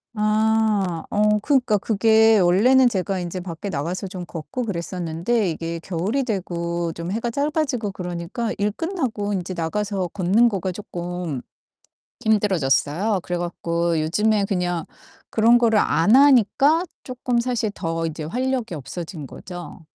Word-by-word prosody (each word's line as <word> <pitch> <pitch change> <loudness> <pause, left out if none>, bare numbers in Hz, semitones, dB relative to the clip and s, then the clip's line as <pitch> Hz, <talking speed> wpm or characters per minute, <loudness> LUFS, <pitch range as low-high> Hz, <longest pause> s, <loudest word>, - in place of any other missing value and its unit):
아 215 -4 +1
어 210 0 +3
그니까 255 -6 +2
그게 220 +1 +4
원래는 240 +9 +5
제가 190 -2 -2
인제 175 +1 -4
밖에 175 +2 -6
나가서 175 +5 -3
좀 180 -2 -7
걷고 230 - -5
그랬었는데 180 +2 -1
이게 165 +1 -4
겨울이 190 +11 -1
되고 170 -6 -2
좀 170 +2 -5
해가 230 +3 -1
짧아지고 280 -5 -1
그러니까 180 +5 -4
일 205 +1 0
끝나고 255 - -2
인제 185 -1 -3
나가서 190 +3 -2
걷는 205 +7 +3
거가 190 -2 -2
쪼끔 175 -6 -5 0.8
힘들어졌어요. 195 -1 +2
그래 175 - -3
갖고 170 -1 -1
요즘에 205 +6 +2
그냥 175 -3 -1 0.5
그런 230 +2 +5
거를 225 -3 +3
안 205 +5 +4
하니까 280 - +5 0.2
쪼끔 250 -1 -1
사실 235 -3 -1
더 165 -2 -2
이제 155 -1 -5
활력이 245 +1 -2
없어진 160 +1 -7
거죠. 175 +5 -9
195 Hz, 295 characters per minute, -22 LUFS, 170-225 Hz, 0.8 s, 원래는